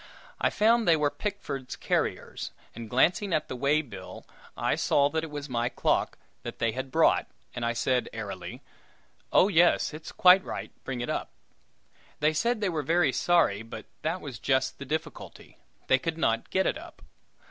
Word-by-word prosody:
I - - +2
found 225 0 +3
they 165 - +6
were 150 -2 +1
Pickford's 145 -11 -5
carriers, - - -2 0.2
and 115 -1 -8
glancing 175 - +2
at 155 - 0
the - - -4
way 140 +4 +2
bill, 100 -9 -10 0.3
I - - +1
saw 140 0 +2
that 160 +1 -1
it 165 - -5
was 145 -1 -6
my 120 -2 -1
clock 120 - 0 0.2
that - - -7
they 115 - +1
had 130 +3 -5
brought, 160 +5 +3 0.3
and 120 - -5
I 115 0 +1
said, 125 +1 0
airily, 95 -5 -7 0.7
"Oh, 185 - +6
yes, 175 -4 +3
it's 155 +1 -8
quite 185 +1 +6
right; - - -6
bring 130 -2 -4
it 120 - -4
up!" - - -3 0.9
They 155 +1 +2
said 220 +9 0
they 205 - +1
were 160 -3 -1
very 160 -1 +2
sorry, 130 - +2
but 115 -1 -9 0.2
that 165 +4 -2
was 130 -6 -7
just 130 -1 0
the 140 - -6
difficulty. 155 +4 -6 0.3
They 130 - +4
could 165 +4 -3
not 115 -8 0
get 190 0 +1
it - - 0
up. - - -13
145 Hz, 180 wpm, -28 LUFS, 120-170 Hz, 0.9 s, they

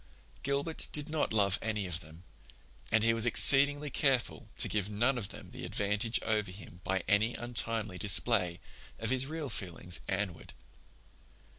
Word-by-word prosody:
Gilbert 140 +4 -1
did 150 +1 0
not 155 -1 -1
love 105 -1 +3
any 105 -3 -2
of 90 -2 -4
them, 80 0 -14 0.7
and 110 -1 +3
he 115 0 +3
was 115 +1 +1
exceedingly 145 +4 +5
careful 135 -4 0
to - - 0
give 105 -2 -2
none 120 +6 +1
of 115 -6 -4
them - - -11
the - - -9
advantage 105 +3 0
over 105 -2 -1
him 90 -2 -12
by 95 0 -1
any 105 +3 +2
untimely 115 -5 -3
display 95 -3 +3 0.4
of - - -2
his 130 0 +3
real 155 -1 -5
feelings 90 -5 -1
Anne 95 -1 -1
ward. - - -14
110 Hz, 160 wpm, -31 LUFS, 95-130 Hz, 0.7 s, exceedingly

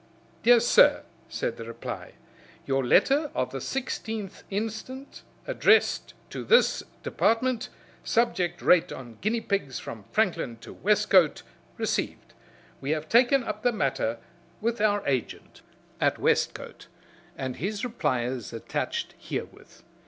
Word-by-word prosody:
"Dr. 240 0 +7
Sir," 370 - +5 0.3
said - - -3
the - - -6
reply. - - -7 0.5
"Your 135 -1 +1
letter 285 - +3
of 125 0 -1
the 135 - -4
16th 220 - -4
inst., 220 +3 -3 0.6
addressed - - +3 0.2
to - - -5
this 480 - +4 0.2
Department, 235 +1 +1 0.3
subject 185 -7 0
rate 180 -2 +4
on 120 -4 -9
guinea 225 +4 0
pigs 195 - -2
from 110 -4 -8
Franklin 170 - 0
to - - -10
Westcote, 200 -5 +3 0.3
ree'd. - - -1 0.6
We 135 - -5
have 155 0 -1
taken 245 +3 +5
up 215 -2 -4
the 245 - +3
matter 135 - -1 0.4
with 235 0 -1
our 205 -1 +2
agent 130 -5 -3 0.4
at - - +2
Westcote, - - -1 0.5
and 130 -1 -4
his 205 - -3
reply 130 - 0
is 125 -1 -4
attached 115 -1 -3
herewith. - - -7
205 Hz, 125 wpm, -27 LUFS, -, 0.6 s, Dr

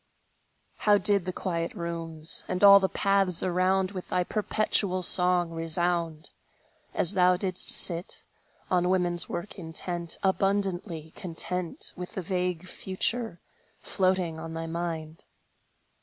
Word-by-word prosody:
How 210 -1 +3
did 200 -3 +3
the 185 - -3
quiet 170 -1 -4
rooms, 165 -3 -5
And 185 +2 -3
all 200 0 +9
the 190 -1 -1
paths 195 -3 0
around, 185 +1 0
With 185 -3 -8
thy 180 - 0
perpetual 200 -2 0
song 180 -1 +4
resound, 165 0 -2 0.6
As 180 - +2
thou 180 -1 +3
didst 185 -1 -1
sit, 175 0 +5 0.5
on 180 -1 +1
woman's 175 -2 +4
work 180 +4 -6
intent, 170 0 -4
Abundantly 190 -4 -1
content 180 0 -3
With 180 0 -8
the 190 - -4
vague 180 -1 -3
future, 190 +1 -3 0.4
floating 185 -4 -1
on 165 0 -8
thy 165 0 -5
mind! 165 -1 -6
180 Hz, 125 wpm, -27 LUFS, 170-190 Hz, 0.6 s, all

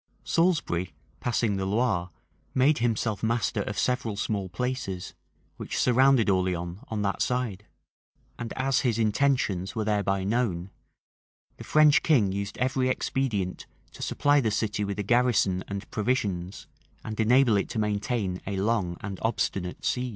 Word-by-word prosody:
Salisbury, 95 - 0 0.2
passing 115 -4 0
the 95 - -2
Loire, 100 -4 0 0.5
made 135 +2 +4
himself 115 -3 0
master 115 -2 0
of 105 +1 -4
several 125 -5 0
small 100 -2 -2
places, 95 -3 -3 0.4
which - - -5
surrounded 130 -1 +4
Orleans 90 -2 0
on 105 -2 -2
that 100 -1 -1
side;[] 115 -5 -1 0.7
and 120 -1 -5
as 135 0 +1
his 120 -5 +1
intentions 110 -5 +1
were 110 -2 -1
thereby 100 -2 0
known, 100 -4 -1 0.9
the - - -9
French 155 +1 +5
king 120 - +3
used 100 +1 -4
every 130 0 +1
expedient 115 -8 -2 0.2
to - - -13
supply 145 0 +2
the 115 - +1
city 105 -1 -1
with 100 0 -3
a 105 - -1
garrison 110 -5 +2
and 100 +1 -5
provisions, 100 -5 -2 0.4
and 110 0 -6
enable 120 +1 +4
it 100 - 0
to 120 - -5
maintain 105 -2 -1
a 100 - -2
long 95 -4 0
and 100 -2 -6
obstinate 100 -5 -2
siege. 125 0 0
110 Hz, 145 wpm, -27 LUFS, 95-125 Hz, 0.9 s, French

